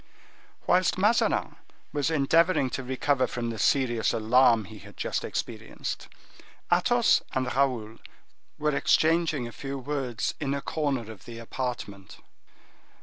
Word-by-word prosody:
Whilst 180 0 +3
Mazarin 210 +5 +2 0.4
was 145 0 0
endeavoring 160 -1 +3
to 130 - -3
recover 130 +1 +1
from 120 -1 -3
the 110 - -6
serious 120 0 +2
alarm 115 0 +4
he 105 +2 -11
had 105 0 -14
just - - -2
experienced, - - -5 0.7
Athos - - +4
and 130 -1 0
Raoul 120 -5 0 0.6
were 150 -1 0
exchanging 155 -1 +2
a - - -8
few 140 +3 -6
words 135 -4 -2
in 140 -2 -1
a 140 - -3
corner 135 -8 -2
of 105 -5 -13
the 115 -1 -9
apartment. 115 -5 -6
130 Hz, 130 wpm, -27 LUFS, 115-145 Hz, 0.7 s, alarm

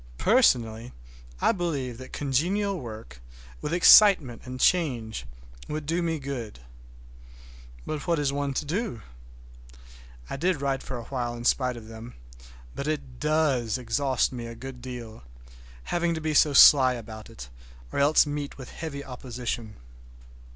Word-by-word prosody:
Personally, 120 - +2 0.5
I - - +4
believe 145 - -3
that 130 - -10
congenial 180 +8 -1
work, 110 - -10 0.4
with - - -4
excitement 175 - +6
and 130 0 -7
change, 120 - +1 0.4
would 155 0 -4
do 165 +4 0
me 165 -1 -1
good. 130 - -6 1.3
But 150 -3 -5
what 170 -1 +2
is 140 -2 0
one 140 -1 -2
to 150 - -2
do? 175 - -3 1.2
I - - -5
did 175 +1 0
write 135 -1 -1
for 130 - -6
a 120 - -7
while 120 -2 -4
in 120 0 -8
spite 125 -1 +1
of 110 -2 -11
them; 115 +2 -10 0.6
but 140 - -5
it 135 -5 -4
does 150 -7 +1
exhaust 130 +2 0
me 120 -2 -6
a 115 - -8
good 125 +1 -9
deal—having 60 - -6
to - - -3
be 155 -1 -2
so 150 0 +5
sly 130 -1 +8
about 110 -2 -9
it, - - -10 0.4
or - - -2
else 145 +3 +5
meet 145 -1 -5
with 130 -2 -10
heavy 140 -3 -6
opposition. 120 -3 -5
130 Hz, 145 wpm, -26 LUFS, 115-155 Hz, 1.3 s, sly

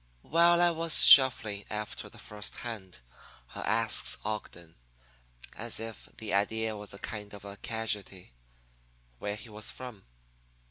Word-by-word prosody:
"While 170 +2 +3
I 175 - +4
was 165 -2 +7
shuffling 120 -7 +6
after 105 0 -6
the - - -16
first 105 -1 -7
hand, 95 - -9 0.5
I - - -8
asks - - +1
Ogden, 85 -6 -7 0.8
as 115 0 -3
if 115 0 -8
the 110 -2 -5
idea 110 +2 -1
was 105 -1 -7
a 100 - -8
kind 105 0 -8
of 100 - -13
a 100 0 -9
casualty, 105 - -4 0.9
where 105 0 -4
he 110 +2 -13
was 105 0 -5
from. 125 -6 -10
105 Hz, 140 wpm, -29 LUFS, 100-115 Hz, 0.9 s, was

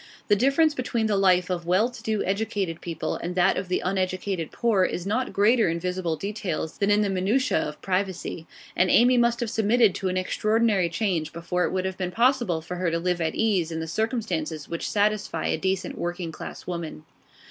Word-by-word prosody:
The 205 - +6
difference 275 +8 +3
between 245 -4 -1
the 215 -2 +1
life 185 -2 +3
of 170 -2 -3
well 185 +6 +3
to 245 -2 -11
do 220 -2 -1
educated 195 -4 -2
people 165 -2 -3
and 175 +1 -5
that 185 +1 +3
of 185 - -3
the 180 - 0
uneducated 185 -2 -1
poor 220 -5 +2
is 180 -1 -2
not 225 +6 -1
greater 215 +1 +3
in 165 +1 -1
visible 180 -2 -2
details 195 -4 -4
than 200 - +2
in 205 +1 +4
the 205 - 0
minutiae 210 +9 +1
of 150 0 -5
privacy, 185 -3 -2 0.3
and 185 - +3
Amy 245 +5 +5
must 240 0 +2
have 235 - -1
submitted 220 -1 +3
to 195 0 -3
an 185 - -1
extraordinary 215 0 +1
change 170 -3 -1
before 175 +2 -1
it - - -2
would 185 0 -1
have 190 0 -4
been 185 -1 -1
possible 235 -6 +2
for 180 +3 -6
her 180 -1 0
to 165 - 0
live 175 0 -1
at 160 - -1
ease 195 -7 +1
in 160 - -3
the 160 - -3
circumstances 170 - -2
which 170 - -4
satisfy 210 0 0
a - - +1
decent 190 0 -2
working 175 -1 -3
class - - -8
woman. 170 -3 -5
190 Hz, 205 wpm, -25 LUFS, 175-220 Hz, 0.3 s, The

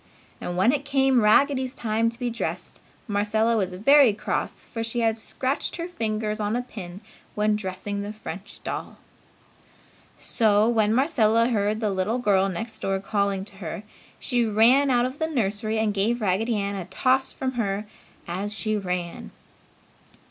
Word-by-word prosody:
And 175 - -4
when 190 +7 +4
it 285 0 -1
came 270 -3 +3
Raggedy's 260 +4 +3
time 225 0 0
to 230 - -7
be 245 -1 -2
dressed, 230 - -4 0.3
Marcella 220 +2 +1
was 190 -4 -1
very 270 +4 +6
cross 205 - -3
for 225 -2 -5
she 230 +1 -2
had 225 -1 +2
scratched 260 +5 -2
her 340 0 -4
finger 220 -9 -2
on 210 +1 -1
a 245 - -1
pin 195 -6 -9 0.3
when 210 0 +2
dressing 200 0 -4
the 205 +1 -5
French 210 -2 -9
doll. - - -5 1.2
So, 215 -1 +3
when 220 -3 +2
Marcella 230 -5 +3
heard 215 -1 0
the 210 -2 +1
little 195 +5 0
girl 195 -5 +2
next 220 +5 -5
door 195 0 -1
calling 200 -1 -1
to 200 -1 -12
her, 185 +2 -6 0.4
she 245 -3 +1
ran 230 +6 +4
out 245 -1 +3
of 260 +3 -5
the 320 - 0
nursery 220 -6 -1
and 220 -1 +1
gave 215 +5 +1
Raggedy 215 +3 0
Ann 200 0 -2
a 190 -3 -5
toss 255 +8 +1
from 260 -1 -3
her 210 -4 -2 0.4
as 190 +4 -3
she 215 0 -1
ran. 180 -4 -4
215 Hz, 165 wpm, -25 LUFS, 200-245 Hz, 1.2 s, very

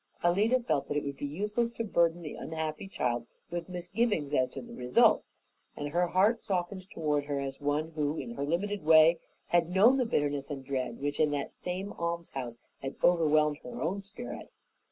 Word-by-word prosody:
Alida 205 +9 +3
felt 190 - -1
that 145 - -1
it 150 - 0
would 140 -1 -4
be 145 - -3
useless 210 +9 -1
to 230 - -3
burden 170 -4 +2
the 150 - -5
unhappy 160 +2 -4
child 120 -9 -1 0.2
with 175 0 -4
misgivings 180 -3 -1
as 130 -3 +3
to - - -7
the 235 -1 -10
result, 125 - +4 0.5
and 145 0 -3
her 175 +4 +2
heart 205 +7 +3
softened 185 0 -2
toward 150 -3 0
her 145 -1 -2
as 135 +1 -5
one 150 +3 0
who 150 -1 -1
in 235 - -5
her 190 - -3
limited 190 +6 -1
way 160 +1 +7 0.3
had 175 -1 +3
known 210 +9 +5
the 255 - +2
bitterness 145 -9 0
and 135 -3 -5
dread 130 -3 -3
which 145 +1 -2
in 155 -1 +4
that 145 -1 -3
same 185 +3 -4
almshouse 165 -8 -4 0.2
had 135 0 -4
overwhelmed 155 -3 +4
her 125 - -8
own 190 +5 -1
spirit. 210 +5 -8
160 Hz, 190 wpm, -30 LUFS, 145-190 Hz, 0.5 s, way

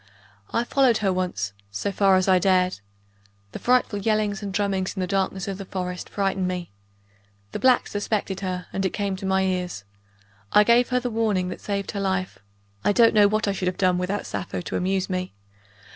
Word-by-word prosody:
I 230 - +1
followed 250 -2 +3
her 190 - +3
once, 175 - -2 0.2
so 100 - -3
far 195 0 +4
as 185 0 +2
I 185 -1 +5
dared. 185 - +2 0.7
The - - -7
frightful 245 -4 +2
yellings 210 -1 0
and 200 -1 -4
drummings 195 -1 -1
in - - -5
the 185 - 0
darkness 190 0 -1
of 195 0 -4
the 195 - -6
forests 180 -1 -5
frightened 195 -2 -1
me. 180 - -4 0.8
The - - -4
blacks 255 -1 +3
suspected 205 -2 -2
her, 185 -2 -3
and 195 - -1
it 190 - -1
came 200 -2 -1
to 190 - -5
my 190 0 +2
ears. 180 - -2 0.7
I 210 - +7
gave 235 +3 +4
her 250 -1 +2
the 245 -1 -3
warning 210 -5 0
that - - -7
saved 200 -1 -3
her 200 - -4
life 190 - -2 0.4
(I - - +3
don't 230 +1 +5
know 210 -2 +6
what 215 +1 0
I - - +2
should 190 -2 -2
have 180 - -1
done 185 -2 +2
without 190 +3 -2
Sappho 95 -2 -4
to - - -5
amuse 190 +1 0
me!) 185 -1 -3
195 Hz, 205 wpm, -24 LUFS, 185-205 Hz, 0.8 s, I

